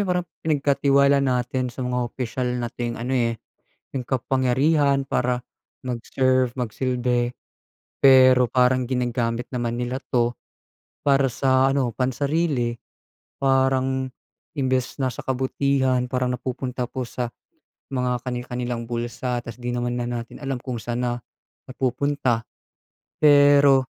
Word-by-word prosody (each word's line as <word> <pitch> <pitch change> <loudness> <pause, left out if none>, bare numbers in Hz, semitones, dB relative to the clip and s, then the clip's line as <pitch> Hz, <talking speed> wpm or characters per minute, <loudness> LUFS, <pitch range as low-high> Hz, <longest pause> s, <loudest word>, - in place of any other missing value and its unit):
yung 185 - -2
parang 180 0 -1
pinagkatiwala 140 -2 +3
natin 125 -1 0
sa 125 +1 -5
mga 125 0 -1
opisyal 125 +1 -3
nating 120 0 -3
ano 125 +3 -3
eh, 115 -3 +1 0.5
yung 130 -3 -4
kapangyarihan 135 +3 +2
para 125 -2 -1 0.4
mag-serve, 130 0 0
mag 125 -4 -3
silbi 125 0 0 0.6
pero 130 -2 +7
parang 125 +1 +2
ginagamit 120 -1 -1
naman 120 -1 -1
nila 125 +1 -2
'to 120 -1 +2 0.7
para 140 -1 +4
sa 130 +1 +3
ano, 135 -4 0
pansarili. 135 0 0 0.6
Parang 130 -1 +1 0.5
imbes 130 -2 0
na 130 -2 -1
sa - - -8
kabutihan, 130 -1 +1
parang 125 0 -1
napupunta 125 -1 -4
po 130 - -4
sa 120 0 -4 0.7
mga 125 -1 0
kani-kanilang 125 -1 -4
bulsa. 120 +1 -3
Tas 115 0 -9
'di 120 0 -4
naman 120 0 -1
na 120 - -2
natin 120 -1 -5
alam 135 -2 -2
kung 125 -2 -4
san 120 0 -3
na 120 0 -2 0.5
napupunta. 130 -1 0 0.8
Pero 145 -2 +6
125 Hz, 125 wpm, -23 LUFS, 120-135 Hz, 0.8 s, pero